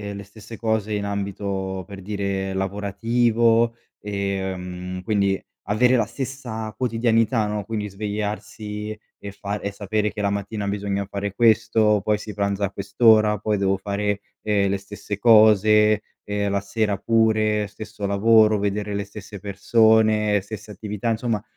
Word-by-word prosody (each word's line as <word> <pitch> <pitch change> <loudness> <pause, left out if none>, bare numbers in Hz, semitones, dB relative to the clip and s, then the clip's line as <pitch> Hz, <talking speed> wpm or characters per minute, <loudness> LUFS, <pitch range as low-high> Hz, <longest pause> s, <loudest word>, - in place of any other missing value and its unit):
le 100 - -7
stesse 105 +2 -12
cose 110 -2 -1
in 100 -1 -1
ambito, 100 -2 -3
per 100 -1 -9
dire, 100 -1 -3
lavorativo, 115 +4 +1 0.3
ehm, 95 -2 -4
quindi 100 -2 +1 0.3
avere 125 +4 +4
la 115 - +2
stessa 120 -5 -5
quotidianità, 115 -2 +1
no, 105 -1 -3
quindi 105 -1 -4
svegliarsi 105 +1 -5 0.2
e 100 - -8
fare 100 +1 -5
e 100 - -2
sapere 105 +1 -1
che 105 - -8
la 100 - +1
mattina 100 +1 -3
bisogna 100 0 -2
fare 100 0 -4
questo, 110 -2 +3
poi 105 -1 +2
si 105 0 -8
pranza 100 0 0
a 95 - -4
quest'ora, 105 +1 +4
poi 105 +1 -1
devo 95 0 +1
fare, 100 +1 -2 0.2
ehm, 100 -2 +1
le 100 - 0
stesse 100 +1 -7
cose 105 -1 +5 0.2
e 105 0 -1
la 100 0 +1
sera 100 0 -1
pure, 110 -1 +2
stesso 105 0 -7
lavoro, 110 +1 +4
vedere 105 +1 -2
le 100 +1 -2
stesse 100 0 -10
persone, 105 +1 +3
stesse 105 +1 -9
attività, 105 +3 -4
insomma, 115 -2 -1
105 Hz, 145 wpm, -23 LUFS, 100-110 Hz, 0.3 s, cose